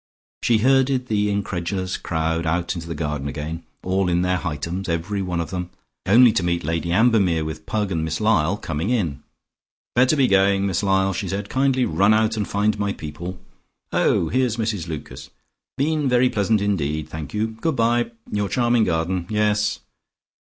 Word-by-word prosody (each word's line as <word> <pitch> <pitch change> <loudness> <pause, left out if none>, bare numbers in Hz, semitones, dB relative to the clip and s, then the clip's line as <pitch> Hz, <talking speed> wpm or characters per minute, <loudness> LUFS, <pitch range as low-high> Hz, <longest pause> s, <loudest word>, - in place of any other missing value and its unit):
She 115 - +3
herded 130 +1 +2
the 105 -1 +1
incredulous 95 -2 -2
crowd 80 0 -2
out 85 +2 0
into 85 -2 -7
the 85 - -4
garden 75 -2 -3
again, 75 +3 -5 0.2
all 95 0 +1
in 90 +1 +1
their 90 0 +1
Hightums, 85 +3 -4
every 85 +5 -2
one 90 -2 -2
of 85 - -4
them, 90 -1 -4 0.4
only 120 +4 +7
to - - +1
meet 85 -1 -1
Lady 85 +2 -2
Ambermere 95 -6 +3
with 80 0 -7
Pug 105 -2 -1
and 80 -3 -1
Miss 80 0 -2
Lyall 100 -4 +2
coming 80 -1 -3
in. 85 - -1 0.7
"Better 130 +5 +4
be 135 -3 +3
going, 100 -1 +3
Miss 95 -1 0
Lyall," 95 -1 +2
she 95 - -3
said. 100 +2 -3
"Kindly 130 -1 +2
run 100 +7 +3
out 110 0 +2
and 105 -2 -2
find 105 +1 0
my 100 -1 0
people. 85 +4 -7 0.5
Oh, 80 - +2
here's 125 -3 +1
Mrs 105 -7 -2
Lucas. 80 -3 -7 0.5
Been 150 0 +1
very 125 0 +3
pleasant 105 0 +1
indeed, 80 -7 -1
thank 80 -1 -7
you, 110 +1 0
good 160 - 0
bye. 120 +1 +2 0.2
Your 105 -1 -1
charming 120 -3 +2
garden. 85 +1 -1
Yes." 105 -1 +1
95 Hz, 175 wpm, -22 LUFS, 85-110 Hz, 0.7 s, only